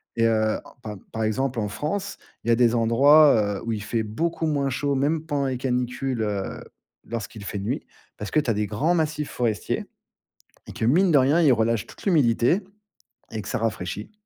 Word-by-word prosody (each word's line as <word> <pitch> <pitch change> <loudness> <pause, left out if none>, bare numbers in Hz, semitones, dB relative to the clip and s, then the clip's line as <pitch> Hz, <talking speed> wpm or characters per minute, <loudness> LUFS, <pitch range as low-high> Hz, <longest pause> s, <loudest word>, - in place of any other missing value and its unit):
Et 115 0 +3
heu, 110 -1 +1
en - - -16
par 105 -1 -6 0.2
par 110 - -2
exemple, 120 +3 -1
en 105 - -1
France, 190 - -4 0.3
il 120 - -1
y - - +5
a 115 - +5
des 120 -1 +3
endroits, 115 -2 +5
heu, - - -8
où 115 - -1
il 105 -2 -4
fait 110 +1 -1
beaucoup 165 +10 -2
moins 140 -3 0
chaud, 140 +2 -1
même 150 +4 0
pendant 145 -3 -1
les 130 -1 -2
canicules, 125 0 -2
heu, 100 -3 -3 0.4
lorsqu'il 110 -2 -6
fait 100 - -4
nuit, 100 - -3 0.3
parce 105 - -6
que - - +3
tu 145 -5 -2
as - - +3
des 105 0 -1
grands 145 - +1
massifs 155 -2 -1
forestiers 115 -4 -1 0.8
et - - -7
que, - - -5
mine 175 +9 +4
de 145 - +6
rien, 140 +6 +3
ils 145 -6 +5
relâchent 115 -1 +1
toute - - -14
l'humidité 145 - +3 0.7
et 110 - -4
que 100 - -10
ça - - -1
rafraîchit. 105 - -3
120 Hz, 205 wpm, -24 LUFS, 110-145 Hz, 0.8 s, de